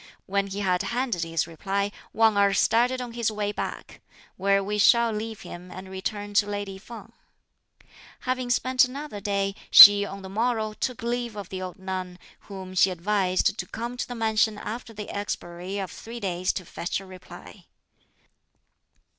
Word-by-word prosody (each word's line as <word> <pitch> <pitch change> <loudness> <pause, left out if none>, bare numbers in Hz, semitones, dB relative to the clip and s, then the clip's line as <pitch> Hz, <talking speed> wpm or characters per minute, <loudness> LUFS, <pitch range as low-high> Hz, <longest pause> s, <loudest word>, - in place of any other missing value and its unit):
When 200 +1 0
he 200 +1 -5
had 180 -2 +1
handed 240 -6 -1
his 165 -1 -1
reply, 195 +5 -2 0.2
Wang 225 -1 +3
Erh 200 -1 +4
started 250 +3 +2
on 245 -1 -6
his 235 -2 0
way 210 -1 -2
back; - - -6 0.3
where 195 +1 +2
we 210 +1 -2
shall 235 +2 +5
leave 220 0 -5
him 180 +1 -10
and 185 +1 -9
return 205 +2 -4
to 205 - -11
lady 205 -1 -4
Feng. 225 +1 -11 1.1
Having 255 -1 -2
spent 255 +1 +3
another 265 -3 -4
day, 200 -1 -1 0.2
she 205 0 +11
on 195 -1 -7
the - - -7
morrow 220 +1 -1
took 245 +2 -4
leave 240 -1 -2
of 200 -3 -7
the 185 -1 -5
old 185 -1 -6
nun, 185 -1 -5 0.3
whom 190 -2 -8
she 185 +1 +4
advised 185 0 0
to - - -2
come 235 +2 -5
to 245 - -4
the 245 - -6
mansion 220 -1 +1
after 230 +3 -6
the 210 -1 -7
expiry 185 -2 -5
of 190 -2 -4
three 235 +1 -9
days 185 -3 -1
to 185 - -5
fetch 170 - -3
a 195 - -11
reply. 185 -1 -13
205 Hz, 170 wpm, -26 LUFS, 190-225 Hz, 1.1 s, she